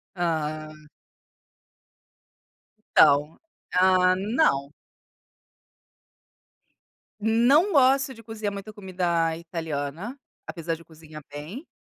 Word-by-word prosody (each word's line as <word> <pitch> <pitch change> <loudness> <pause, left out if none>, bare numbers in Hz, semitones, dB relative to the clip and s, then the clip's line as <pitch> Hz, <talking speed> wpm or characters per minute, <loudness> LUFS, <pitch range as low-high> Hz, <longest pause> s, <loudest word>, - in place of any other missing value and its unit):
Ah. 155 -3 -2 2.2
Então, 145 +2 +5 0.4
ah, 185 0 +4
não. 190 - +1 2.5
Não 255 - +3
gosto 270 0 +4
de 230 -1 -15
cozinhar 220 -2 -4
muita 200 +2 -7
comida 175 -5 -1
italiana, 165 - -5 0.3
apesar 165 -1 -3
de 165 - -15
eu - - -17
cozinhar 155 -1 -13
bem, 160 - -8
180 Hz, 80 wpm, -25 LUFS, 155-220 Hz, 2.5 s, Então